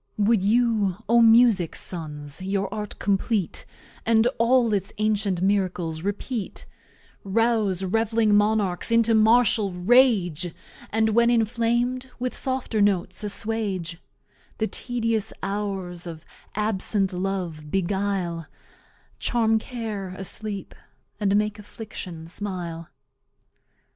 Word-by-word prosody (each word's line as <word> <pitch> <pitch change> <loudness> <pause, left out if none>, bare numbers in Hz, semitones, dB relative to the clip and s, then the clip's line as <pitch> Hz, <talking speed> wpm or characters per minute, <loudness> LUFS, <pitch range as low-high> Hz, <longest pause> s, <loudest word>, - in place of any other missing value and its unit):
Wou'd 210 0 +3
you, 215 -3 +2
O 235 +1 +5
Musick's 225 -6 +5
Sons, 150 -2 -4
your 195 +1 -2
art 210 -1 -5
Compleat, 200 0 -1 0.4
And 225 0 +3
all 235 -1 +3
its 200 0 -1
ancient 205 -4 0
Miracles 180 -5 0
repeat, 205 +3 -3 0.6
Rouse 210 -2 +1
Rev'ling 225 +2 +2
Monarchs 205 -2 +2
into 230 0 +4
Martial 220 -2 +4
Rage, 180 - +3 0.3
And, 220 +1 +2
when 235 +2 +4
Inflam'd, 240 +2 +1
with 250 0 -3
Softer 260 -5 -1
Notes 190 -1 +1
As 205 - -2
swage; 200 -6 -2 0.6
The 220 - 0
tedious 230 -2 -2
Hours 195 -4 -3
of 160 -1 -8 0.3
absent 205 -2 0
Love 180 -5 -3
beguile, 190 -3 -1 0.7
Charm 225 -2 +2
Care 215 -6 -5
asleep, 200 +1 -4 0.5
and 200 -1 +2
make 210 0 0
Affliction 205 -6 -8
smile? 170 -3 -5
205 Hz, 105 wpm, -24 LUFS, 185-225 Hz, 0.7 s, O